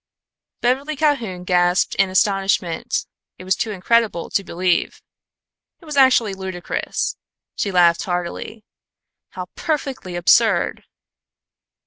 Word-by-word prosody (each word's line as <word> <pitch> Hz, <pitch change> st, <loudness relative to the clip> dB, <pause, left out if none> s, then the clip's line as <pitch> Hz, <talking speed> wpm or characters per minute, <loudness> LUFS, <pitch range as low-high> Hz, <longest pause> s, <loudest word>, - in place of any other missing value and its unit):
Beverly 270 Hz, +5 st, 0 dB
Calhoun 250 Hz, -, 0 dB
gasped 180 Hz, 0 st, +2 dB
in 195 Hz, -1 st, +2 dB
astonishment. 195 Hz, -3 st, 0 dB, 0.3 s
It -, -, -10 dB
was 185 Hz, +1 st, +1 dB
too 225 Hz, -, -2 dB
incredible 210 Hz, -2 st, 0 dB
to 200 Hz, -, 0 dB
believe. 180 Hz, -1 st, -1 dB, 0.8 s
It 335 Hz, -, -18 dB
was 300 Hz, -2 st, -6 dB
actually 255 Hz, -6 st, +4 dB
ludicrous. 190 Hz, -2 st, -4 dB, 0.4 s
She 200 Hz, -, -2 dB
laughed 175 Hz, -2 st, +4 dB
heartily. 180 Hz, +4 st, -4 dB, 0.6 s
"How -, -, -7 dB
perfectly 275 Hz, -, -3 dB
absurd." 175 Hz, 0 st, +3 dB
195 Hz, 105 wpm, -20 LUFS, 180-240 Hz, 0.8 s, actually